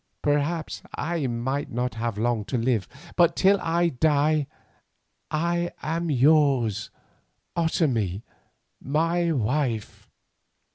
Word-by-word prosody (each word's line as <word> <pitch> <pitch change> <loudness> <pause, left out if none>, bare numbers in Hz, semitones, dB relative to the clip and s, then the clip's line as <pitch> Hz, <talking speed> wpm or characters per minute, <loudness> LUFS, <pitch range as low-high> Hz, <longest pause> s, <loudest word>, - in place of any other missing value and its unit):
Perhaps 150 +3 0
I 170 +3 -2
have 130 +1 -2
not 120 -2 -2
long 115 0 0
to 130 - -2
live, 115 -4 0 0.3
but 170 -2 +4
till 195 +1 +4
I 170 +1 +1
die 150 +1 +2 0.8
I 170 +2 -1
am 165 +2 -1
yours, 135 -7 +3 0.7
Otomie 120 - 0 0.6
my 165 +5 +1
wife." 125 -4 -2
145 Hz, 95 wpm, -25 LUFS, 120-165 Hz, 0.8 s, but